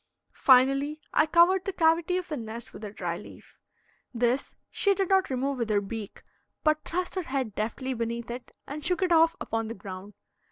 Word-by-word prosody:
Finally, 275 +3 +4
I 305 - +4
covered 355 +3 +5
the 390 - -1
cavity 335 +1 +3
of 365 - -4
the 310 - -3
nest 230 -2 -6
with - - -10
a 210 - -4
dry 175 -4 -3
leaf. - - -14 0.6
This 245 +3 0 0.2
she 400 -1 +2
did 385 -2 -1
not 385 -1 +3
remove 265 +1 -1
with 230 -2 -1
her 210 -1 +3
beak, 205 +1 -7 0.4
but 310 0 +2
thrust 360 +2 -3
her 375 - -1
head 265 - -3
deftly 235 +6 -3
beneath 235 0 -3
it 245 +1 -8
and 295 +2 -7
shook 360 +2 0
it 365 - +1
off 330 0 +5
upon 225 0 -2
the 230 - -5
ground. 190 +1 -9
265 Hz, 195 wpm, -28 LUFS, 225-330 Hz, 0.6 s, covered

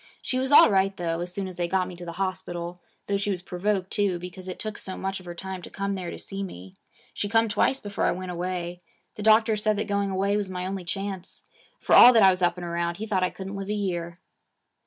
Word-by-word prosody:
She 255 - 0
was 265 +1 -1
all 290 - +8
right 195 0 +2
though 165 -1 -2
as 175 +1 -4
soon 195 +1 -4
as 185 -2 -9
they 175 -1 0
got 185 +1 +1
me 180 - -8
to 175 0 -9
the 170 - -6
hospital, 180 -2 -4 0.2
though 200 - 0
she 200 +1 -2
was 180 -3 -2
provoked 190 +1 -1
too, 200 -4 +1
because 180 +1 -9
it 185 - -5
took 215 -1 -4
so 190 - -3
much 195 0 -3
of 185 - -14
her 175 - -6
time 190 +1 -5
to - - -10
come 200 0 -3
there 185 -3 -4
to - - -6
see 195 0 -6
me. 95 - -8 0.4
She 205 - -3
come 225 +1 +3
twice 265 +5 +1
before 205 -4 -2
I - - +3
went 185 0 -4
away. 175 0 -4 0.3
The - - -8
doctor 220 +1 +5
said 215 0 +1
that 210 - -1
going 200 -1 0
away 195 +1 +1
was 205 -2 -2
my 180 -1 -4
only 190 -1 -4
chance. 195 0 -5 0.4
For - - 0
all 250 - +10
that 225 -3 +6
I 190 - +8
was 185 0 -1
up 175 0 +2
and 175 - -5
around, 170 0 -2
he 220 - -4
thought 200 -4 0
I 185 - +2
couldn't 195 +1 -7
live 195 0 -5
a - - 0
year.' 175 -4 -3
190 Hz, 260 wpm, -26 LUFS, 180-200 Hz, 0.4 s, all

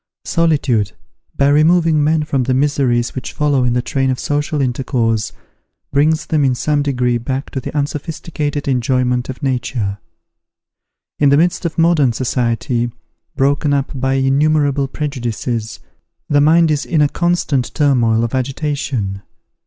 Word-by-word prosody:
Solitude, 140 - +1 0.4
by 140 - +3
removing 155 +1 +3
men 155 +1 +2
from 140 -3 -1
the 130 0 +1
miseries 130 -4 +1
which 130 - -6
follow 145 -3 +1
in 125 -1 +1
the 125 0 0
train 135 0 0
of 130 - 0
social 150 +2 -2
intercourse, 120 -4 0 0.6
brings 155 +3 +2
them 155 -2 +1
in 130 -2 +2
some 145 +4 0
degree 125 -4 0
back 130 +3 -4
to 135 - -3
the - - -6
unsophisticated 145 0 -3
enjoyment 125 -1 0
of 130 +3 -7
nature. 120 -6 -2 1.2
In 145 - +4
the 140 - +4
midst 175 +2 +1
of 165 - -3
modern 165 -7 +3
society, 120 -1 -1 0.4
broken 140 +1 +1
up 140 -1 -1
by 135 0 -1
innumerable 140 +1 +2
prejudices, 120 -5 -4 0.5
the 145 -1 +3
mind 160 +2 +4
is 150 -2 0
in 155 -4 +1
a - - +4
constant 155 -6 0
turmoil 120 -6 +2
of 115 - -3
agitation. 130 -6 -2
135 Hz, 145 wpm, -17 LUFS, 125-150 Hz, 1.2 s, In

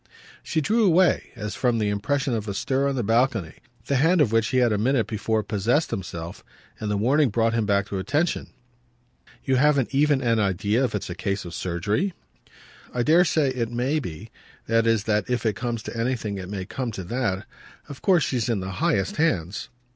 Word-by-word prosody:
She 160 - -1
drew 220 +9 +2
away, 185 -1 +4
as 105 0 -5
from 120 -2 +1
the 105 -2 0
impression 135 +7 -1
of 110 -2 -2
a 100 - -3
stir 135 +5 0
on 140 - -2
the 125 - -1
balcony, 115 - +1 0.3
the 140 - +1
hand 165 +6 +3
of 135 -8 +3
which 115 0 +2
he 130 - 0
had 120 -3 +3
a - - +1
minute 120 0 +2
before 110 0 -1
possessed 115 +10 0
himself; 85 -5 -6 0.4
and 105 - -3
the 105 - 0
warning 135 +6 +3
brought 115 +1 +1
him 115 -3 0
back 100 -1 +2
to 100 - -3
attention. 145 - 0 1.0
"You 130 -1 +1
haven't 140 -2 +2
even 145 0 +3
an 115 -3 +1
idea 100 +4 +1
if 120 - -3
it's 95 - -4
a - - -2
case 100 +2 -2
for 85 - -8
surgery?" 100 - -1 0.8
"I 120 - -1
dare 165 +6 +5
say 155 -4 +2
it 120 -3 -2
may 130 +6 0
be; 90 - -8 0.3
that 115 0 +2
is 115 -3 +2
that 105 0 0
if 120 -2 -1
it 110 -3 +1
comes 115 0 -3
to - - -7
anything 115 -4 -2
it 90 0 -7
may 95 -2 -4
come 125 +3 -4
to 95 - -5
that. 105 -1 -2 0.4
Of 140 - -10
course 180 -6 +4
she's 120 -3 -1
in 115 -4 +1
the 95 0 -5
highest 95 -2 +1
hands." 100 - 0
115 Hz, 205 wpm, -24 LUFS, 105-135 Hz, 1.0 s, dare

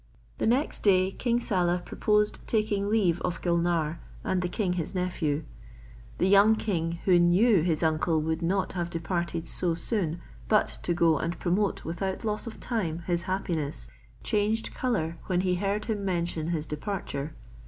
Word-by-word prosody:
Next 255 +6 +1
day 190 -2 +3
King 240 +3 0
Saleh 180 -5 0
proposed 210 -1 +1
taking 215 -2 0
leave 190 -6 +2
of 175 - -2
Gulnare 170 -2 +1 0.2
and 185 -1 0
the 180 - -1
king 185 -1 0
his 175 +1 -3
nephew. 165 -5 -1 0.7
The 180 - +2
young 200 +3 +6
king, 170 -7 -1
who 180 -2 +5
knew 180 +3 +5
his 165 -1 +1
uncle 160 0 +2
would 160 +2 -1
not 185 +3 0
have 175 -2 -2
de 170 - -3
parted 170 -1 -2
so 175 -2 0
soon 170 -2 -1 0.3
but 210 -1 +2
to 175 - -1
go 165 -3 +3
and 170 +1 -2
promote 195 +3 0
without 190 +6 -3
loss 215 +2 -2
of 225 - -7
time 170 -8 -2
his 175 -1 0
happiness, 155 - -2 0.3
changed 215 +2 0
colour 170 -10 -1
when 180 -1 +1
he 185 -1 +1
heard 200 +2 -1
him 215 -3 -2
mention 170 -4 -1
his 165 -3 -1
departure. 150 -3 -4
180 Hz, 165 wpm, -28 LUFS, 165-205 Hz, 0.7 s, young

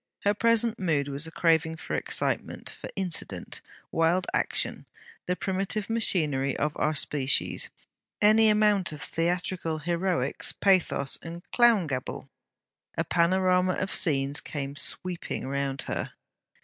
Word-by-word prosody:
Her 205 - +3
present 230 +1 +2
mood 155 -7 +1
was 140 +3 -1
a - - -9
craving 160 -1 +2
for - - -6
excitement; - - -2
for - - -9
incident, 185 -4 -2 0.3
wild 165 +3 +2
action, - - -1 0.4
the 180 - +1
primitive 195 +3 -2
machinery 150 - +2
of 150 0 -1
our 155 +1 0
species; 140 0 0 0.5
any 215 +1 +6
amount 210 -4 +3
of 150 - -7
theatrical 170 -1 -1
heroics, 170 -3 0
pathos, 185 -8 +2
and 170 +1 -8
clown 235 -6 +5
gabble. 130 -4 -5 0.7
A - - +2
panorama 185 +1 +2
of 190 +2 -2
scenes 140 -3 +1
came 140 -1 -5
sweeping 175 -1 -1
round 135 0 -2
her. - - -4
170 Hz, 125 wpm, -27 LUFS, 150-190 Hz, 0.7 s, any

